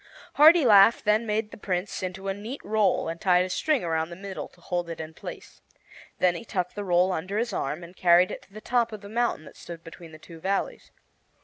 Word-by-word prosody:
Hartilaf 250 - +7
then 215 +2 +2
made 215 +1 -1
the - - -10
Prince 195 -1 -3
into 190 +1 -5
a 195 - 0
neat 220 +8 -7
roll 210 -5 +1
and 165 0 -5
tied 180 -1 +3
a 185 - -6
string 305 +3 0
around 160 -1 -1
the 170 - -8
middle, 195 +1 -7
to - - -25
hold 175 0 -3
it 165 - -6
in 160 0 -7
place. - - -10 0.6
Then 180 -1 +3
he 175 - -7
tucked 180 -5 -3
the 205 - -5
roll 180 0 +2
under 185 +4 -3
his 230 -1 -1
arm 150 +1 -3
and 175 +2 -12
carried 180 0 +4
it - - -7
to - - -23
the 215 +2 -10
top 235 -1 0
of 215 -2 -8
the 200 - -10
mountain 235 -8 -1
that - - -14
stood 170 -1 -10
between 165 0 -12
the 155 - -11
two 165 +1 -13
valleys. 195 +4 -3
190 Hz, 230 wpm, -26 LUFS, 175-215 Hz, 0.6 s, Hartilaf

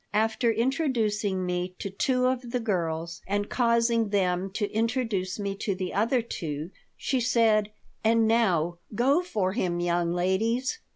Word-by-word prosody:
After 225 +2 +2
introducing 225 - 0
me 180 0 -2
to 200 - -5
two 250 +6 +1
of 255 -1 0
the 250 +1 -1
girls 170 -5 -2
and 205 +1 -1
causing 235 -2 +2
them 190 -2 +1
to 205 -1 -1
introduce 225 -5 -1
me 200 -2 -2
to 200 -1 -2
the 185 -1 -4
other 230 +4 +2
two, 160 -6 -5 0.3
she 265 - 0
said: 225 -3 +3 0.3
"And 225 0 +4
now 175 -7 +2 0.2
go 275 +9 +3
for 205 - -1
him, 175 -6 -1
young 175 -1 +1
ladies! 225 - 0
210 Hz, 150 wpm, -27 LUFS, 185-235 Hz, 0.3 s, And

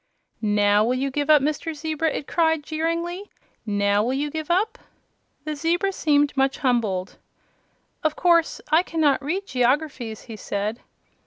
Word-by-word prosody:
"NOW 205 -1 +3
will 245 +3 +1
you 270 +1 -1
give 290 +2 -2
up, 300 -3 +6
Mr. 305 +2 -2
Zebra?" 315 +1 -1
it 295 - -4
cried, 320 -2 +1
jeeringly; 335 +5 -3 0.4
"now 205 0 +2
will 250 +3 0
you 290 +2 -2
give 315 +1 -5
up?" 395 +6 +1 0.6
The 305 0 -4
zebra 345 +6 0
seemed 290 -4 +2
much 270 0 +1
humbled. 215 -8 -1 0.8
"Of 310 -1 +1
course 340 -2 +2
I 320 +2 +6
cannot 315 -6 +1
read 370 +8 -2
geographys," 255 - -1
he 230 - -9
said. 210 +3 -3
295 Hz, 150 wpm, -23 LUFS, 240-325 Hz, 0.8 s, up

